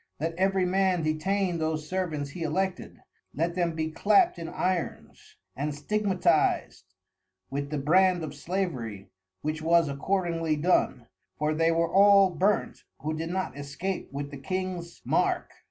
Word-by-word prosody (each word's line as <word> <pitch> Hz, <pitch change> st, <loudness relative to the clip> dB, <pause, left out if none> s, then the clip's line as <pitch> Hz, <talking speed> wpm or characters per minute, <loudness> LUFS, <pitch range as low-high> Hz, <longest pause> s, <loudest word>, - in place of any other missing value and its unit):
Let 165 Hz, +3 st, -1 dB
every 190 Hz, +1 st, +1 dB
Man 185 Hz, -2 st, +2 dB
detain 175 Hz, +3 st, 0 dB
those 155 Hz, -1 st, -2 dB
Servants 155 Hz, -6 st, -2 dB
he 175 Hz, -, -8 dB
Elected, 180 Hz, +4 st, -2 dB, 0.3 s
let 165 Hz, +3 st, 0 dB
them 170 Hz, -2 st, 0 dB
be 160 Hz, 0 st, -2 dB
clapt 200 Hz, +1 st, +3 dB
in 165 Hz, -, -5 dB
Irons, 180 Hz, -3 st, -3 dB, 0.2 s
and 145 Hz, +2 st, -2 dB
stigmatiz'd 195 Hz, +4 st, 0 dB, 0.6 s
with 140 Hz, +1 st, -3 dB
the 150 Hz, -, -2 dB
Brand 180 Hz, +4 st, +3 dB
of 150 Hz, -2 st, -5 dB
Slavery, 140 Hz, -, -4 dB, 0.3 s
which 155 Hz, +1 st, -2 dB
was 165 Hz, 0 st, +4 dB
accordingly 165 Hz, +2 st, 0 dB
done, 150 Hz, -6 st, +1 dB, 0.3 s
for 150 Hz, +1 st, 0 dB
they 165 Hz, +1 st, +2 dB
were 165 Hz, 0 st, 0 dB
all 200 Hz, -1 st, +7 dB
burnt, 190 Hz, +5 st, 0 dB, 0.2 s
who 155 Hz, +1 st, -2 dB
did 165 Hz, +1 st, -4 dB
no 185 Hz, +1 st, -2 dB
excape 145 Hz, +7 st, -5 dB
with 140 Hz, +1 st, -5 dB
the 140 Hz, -, -7 dB
King's 185 Hz, +2 st, -4 dB
Mark. -, -, +1 dB
165 Hz, 145 wpm, -27 LUFS, 150-185 Hz, 0.6 s, all